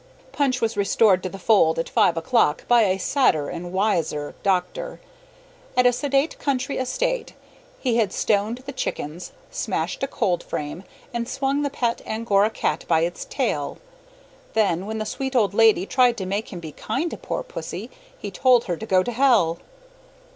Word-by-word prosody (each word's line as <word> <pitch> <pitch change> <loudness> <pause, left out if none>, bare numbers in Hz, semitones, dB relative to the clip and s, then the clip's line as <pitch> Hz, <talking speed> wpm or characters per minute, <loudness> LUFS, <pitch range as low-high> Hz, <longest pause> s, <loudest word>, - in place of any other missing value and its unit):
Punch 265 -3 0
was 225 0 0
restored 200 -1 +3
to 185 - -3
the 195 - -8
fold 195 -5 +3
at 165 - -1
five 170 - +3
o'clock 195 -4 +1
by 240 -2 +5
a 190 -1 +1
sadder 190 - +2
and 175 0 -6
wiser 175 -7 0
doctor. 200 - -1 0.8
At 250 - +5
a 245 - +6
sedate 280 +3 0
country 275 -1 -1
estate - - -2 0.4
he 245 - 0
had 215 -5 +2
stoned 215 +6 0
the 280 - -5
chickens, 170 - -4 0.2
smashed - - -2
a 270 - 0
cold 180 -9 0
frame, 150 +5 -5 0.3
and 235 0 -3
swung 275 +1 0
the 285 - 0
pet 240 -4 -1
Angora 215 -2 +2
cat - - -2
by 160 -1 +3
its 170 +1 -2
tail. - - -2 0.8
Then 200 -4 +1
when 220 0 -3
the 215 - -3
sweet 265 +4 -4
old 210 -5 +3
lady 220 -4 +5
tried 250 +1 +3
to 190 - -3
make 200 +4 -3
him 180 - -6
be 160 -2 -8
kind 315 - -3
to - - -5
poor - - -4
pussy, 485 -1 -7 0.3
he - - -6
told 250 -3 +4
her 175 -2 -3
to 220 - -6
go 185 -2 +4
to 245 - -3
hell. 230 -10 +3
220 Hz, 175 wpm, -23 LUFS, 185-260 Hz, 0.8 s, a